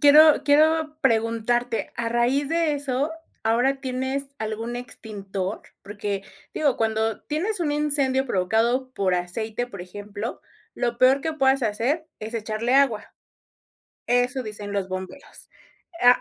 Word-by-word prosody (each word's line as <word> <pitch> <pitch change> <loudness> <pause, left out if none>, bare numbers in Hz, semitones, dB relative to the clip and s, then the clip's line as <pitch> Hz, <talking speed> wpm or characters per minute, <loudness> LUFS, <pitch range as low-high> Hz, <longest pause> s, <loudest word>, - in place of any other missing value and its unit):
quiero 300 +1 +7
quiero 310 +1 +3
preguntarte, 230 +1 +1
a 235 -1 -1
raíz 245 +4 +1
de 330 -1 +1
eso, 280 +1 -1 0.3
¿ahora 250 +5 +2
tienes 265 +1 0
algún 220 +2 -3
extintor? 200 -5 -5 0.2
Porque, 205 -1 -4 0.3
digo, 290 -4 +2
cuando 220 -1 0
tienes 360 +6 -2
un 300 -3 +1
incendio 280 -3 +1
provocado 235 +6 +1
por 190 -5 +1
aceite, 220 +7 -2
por 200 -7 -9
ejemplo, 205 +4 -6 0.3
lo 240 -1 -1
peor 260 +2 +5
que 320 +1 -2
puedas 270 -3 +2
hacer 245 +9 0
es 220 +2 -6
echarle 225 +3 -1
agua. 270 -6 +2 1.0
Eso 245 +2 +2
dicen 210 -2 -5
los 200 -2 -1
bomberos, 185 +9 -8 0.5
ah 245 0 +7
245 Hz, 130 wpm, -24 LUFS, 215-275 Hz, 1.0 s, quiero